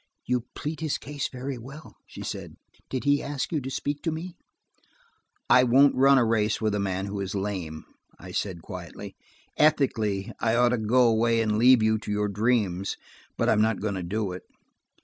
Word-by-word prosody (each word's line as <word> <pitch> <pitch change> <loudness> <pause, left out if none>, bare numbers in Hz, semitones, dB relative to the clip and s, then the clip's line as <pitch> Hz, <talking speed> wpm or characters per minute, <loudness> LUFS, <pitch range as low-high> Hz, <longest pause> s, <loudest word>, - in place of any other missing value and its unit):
"You 125 -1 -1
plead 155 +1 -4
his 155 -3 -1
case 145 -1 -4
very 130 0 -5
well," 140 +6 -11
she - - -9
said. - - -6 0.3
"Did 130 - -3
he 145 0 +3
ask 145 -2 -4
you 155 -4 0
to 130 - -5
speak 145 +2 -3
to 165 - -1
me?" 165 +3 -6 1.1
"I 125 - +6
won't 135 +3 +5
run 135 +1 +5
a 120 - +4
race 110 -1 +1
with 110 -2 0
a 105 - 0
man 95 -1 -2
who 100 0 -5
is 100 0 -4
lame," 95 -6 -4 0.3
I - - -10
said 90 -5 -3
quietly. 90 -3 -8 0.4
"Ethically, 110 -10 +2
I 115 0 +1
ought 120 0 +4
to 125 -1 0
go 120 +3 +4
away 115 0 +2
and 110 -1 +1
leave 125 -1 +6
you 110 0 +2
to 105 - -6
your 105 0 0
dreams, 100 -3 0 0.4
but - - +1
I - - +5
am 105 - +2
not 110 -1 +1
going 105 -1 -2
to 95 - -3
do 100 +3 -2
it. 90 - -7
115 Hz, 200 wpm, -26 LUFS, 100-135 Hz, 1.1 s, I